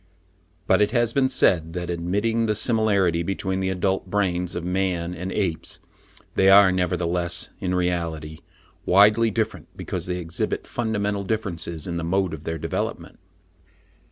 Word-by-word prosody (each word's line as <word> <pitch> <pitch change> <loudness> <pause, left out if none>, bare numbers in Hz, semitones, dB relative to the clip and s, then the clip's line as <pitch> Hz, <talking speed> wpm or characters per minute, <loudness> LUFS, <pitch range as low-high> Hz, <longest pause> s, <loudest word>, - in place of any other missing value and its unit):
But 95 +2 +3
it 105 - +4
has 120 -2 +1
been 135 -1 +2
said, 80 -10 +3
that, 90 0 -3
admitting 105 +7 0
the 105 - +1
similarity 100 -7 +2
between 95 +1 -2
the 95 0 -1
adult 95 0 -1
brains 90 -3 -1
of 85 - -3
man 90 -2 -1
and 90 +2 -5
apes, 90 -7 -2 0.5
they 95 - +4
are 95 -1 +8
nevertheless, 90 -1 -1
in 90 -1 -1
reality, 85 -4 -2 0.4
widely 105 +4 +5
different, 110 +1 -3
because 90 0 -4
they 90 0 -2
exhibit 85 -1 -3
fundamental 105 -3 -2
differences 85 -7 -3
in 85 -1 -3
the 85 - -3
mode 95 0 0
of 80 0 -8
their 80 0 -3
development. - - -4
95 Hz, 150 wpm, -24 LUFS, 85-100 Hz, 0.5 s, are